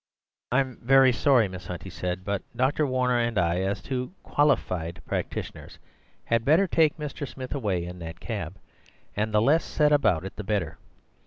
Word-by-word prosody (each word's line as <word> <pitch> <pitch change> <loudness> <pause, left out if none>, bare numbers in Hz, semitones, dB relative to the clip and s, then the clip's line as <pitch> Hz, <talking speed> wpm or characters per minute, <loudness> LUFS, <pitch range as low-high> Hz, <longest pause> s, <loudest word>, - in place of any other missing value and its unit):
"I'm 130 0 +1
vurry 135 +1 +6
sorry, 125 -4 +4
Miss 95 -1 -9
Hunt," 90 -1 -6
he 95 - -8
said; 90 +1 -4
"but 100 -1 -1
Dr. 135 +4 +1
Warner 125 -1 +1
and 115 -2 0
I, 85 0 +2
as 95 +1 -2
two 130 +4 -3
quali 145 +1 +3
FIED 85 -1 -5
practitioners, - - -5 0.5
had 115 -1 +1
better 160 +9 +4
take 160 -4 +2
Mr. 150 -2 -5
Smith 130 -1 -7
away 100 -11 -1
in 90 +1 -8
that 80 0 -8
cab, 95 -6 -5 0.6
and 110 +1 -1
the 105 0 +3
less 155 +7 +4
said 150 -1 +2
about 105 - +3
it 95 - -8
the 105 - -4
better. 100 -5 -2
115 Hz, 180 wpm, -26 LUFS, 95-135 Hz, 0.6 s, vurry